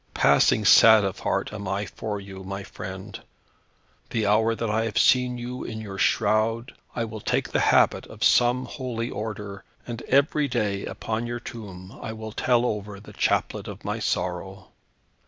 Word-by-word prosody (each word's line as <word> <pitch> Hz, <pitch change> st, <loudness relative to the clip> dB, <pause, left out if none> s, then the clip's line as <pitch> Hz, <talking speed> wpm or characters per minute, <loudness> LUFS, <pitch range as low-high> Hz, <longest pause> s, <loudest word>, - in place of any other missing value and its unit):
Passing 70 Hz, +9 st, +4 dB
sad 110 Hz, +1 st, +8 dB
of 95 Hz, -2 st, -2 dB
heart -, -, -1 dB
am 100 Hz, -2 st, -6 dB
I 100 Hz, +2 st, -1 dB
for 105 Hz, -1 st, -5 dB
you, 95 Hz, -1 st, -10 dB
my 100 Hz, +1 st, -5 dB
friend. 95 Hz, +2 st, -8 dB, 0.9 s
The 110 Hz, -2 st, -1 dB
hour 110 Hz, +2 st, +3 dB
that 115 Hz, -, -3 dB
I 110 Hz, +1 st, 0 dB
have 115 Hz, -, -3 dB
seen 125 Hz, -1 st, +4 dB
you 125 Hz, +1 st, -5 dB
in 110 Hz, -, -6 dB
your 100 Hz, -3 st, -7 dB
shroud, 110 Hz, +4 st, +1 dB, 0.2 s
I 115 Hz, -, -1 dB
will 110 Hz, -1 st, -8 dB
take -, -, 0 dB
the -, -, +1 dB
habit -, -, +3 dB
of -, -, -7 dB
some 125 Hz, +1 st, +4 dB
holy 125 Hz, -3 st, -4 dB
order, 105 Hz, -2 st, -6 dB, 0.2 s
and 120 Hz, -1 st, -6 dB
every 145 Hz, +2 st, +3 dB
day, 105 Hz, -6 st, -1 dB
upon 115 Hz, +1 st, -3 dB
your 120 Hz, 0 st, -4 dB
tomb, 100 Hz, -6 st, -10 dB
I 110 Hz, -, -5 dB
will 110 Hz, 0 st, -7 dB
tell 120 Hz, +2 st, +2 dB
over 105 Hz, -3 st, -3 dB
the 105 Hz, -, -13 dB
chaplet -, -, 0 dB
of -, -, -9 dB
my -, -, -2 dB
sorrow." 95 Hz, +2 st, -3 dB
110 Hz, 175 wpm, -25 LUFS, 100-120 Hz, 0.9 s, sad